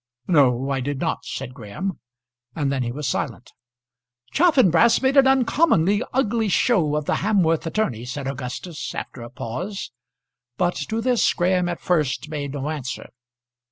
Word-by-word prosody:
"No, 135 -5 +3
I 135 - 0
did 140 +2 -3
not," 165 - -2
said 130 -1 -5
Graham; 125 - -5 0.6
and 145 -3 0
then 135 -2 -1
he 120 -1 -2
was 145 +2 -4
silent. 125 -3 -3 0.8
"Chaffanbrass 235 - +5
made 265 +1 +1
an 275 -1 +7
uncommonly 245 - +3
ugly 230 -4 +1
show 175 - +2
of 150 -1 -1
the - - +1
Hamworth 180 -6 +1
attorney," 130 - -1
said 135 +3 -5
Augustus, 140 +5 -5
after 125 - -6
a 120 - -8
pause; 130 - -5 0.7
but 175 0 +1 0.2
to 225 +1 -1
this 250 -1 +3
Graham 180 0 +1
at 175 - -4
first 155 -4 0
made 145 -3 -4
no 145 +1 -3
answer. 135 -4 -5
160 Hz, 155 wpm, -23 LUFS, 135-205 Hz, 0.8 s, an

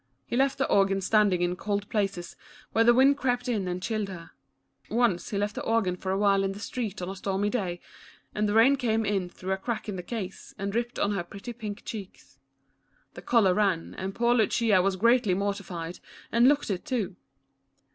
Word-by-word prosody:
He - - -4
left 270 +2 +2
the 275 - +1
organ 195 -1 +3
standing 195 -2 +3
in 175 0 0
cold 205 +1 -2
places, 195 -5 -2 0.4
where 225 - +3
the 240 - +7
wind 270 +3 +5
crept 250 -1 0
in 210 -6 -1
and 180 0 -3
chilled 215 -2 -2
her. 170 -3 -9 0.6
Once 230 -6 +1
he 205 - -2
left 205 +1 -1
the - - -5
ororan 225 -6 +1
for 190 +1 -4
a 190 - +1
while 200 -1 +3
in 195 0 -1
the 200 - -9
street 210 -4 -4
on 180 - -4
a 195 - -5
stormy 195 +1 -1
day, 185 -8 -2 0.5
and 210 0 0
the 205 - 0
rain 260 +5 +6
came 225 -4 0
in 195 -3 -1
through 185 +1 -6
a 190 - +1
crack 220 +4 -4
in 205 -3 -4
the - - -4
case 190 -1 -6
and 200 +1 -3
dripped 235 +3 -2
on 205 - +1
her 195 -4 -1
pretty 200 +6 -8
pink 215 -2 -7
cheeks. 200 -4 -9 0.7
The - - -9
color 215 -6 +3
ran, 190 -5 0
and 190 +1 -5
poor 235 0 +3
Lucia 220 -3 +3
was 195 +1 +1
greatly 230 -1 +3
mortified, 185 -4 -4 0.3
and 235 +2 +5
looked 290 -5 +2
it, 185 - -3
too. 215 -8 -2
205 Hz, 205 wpm, -27 LUFS, 190-230 Hz, 0.7 s, the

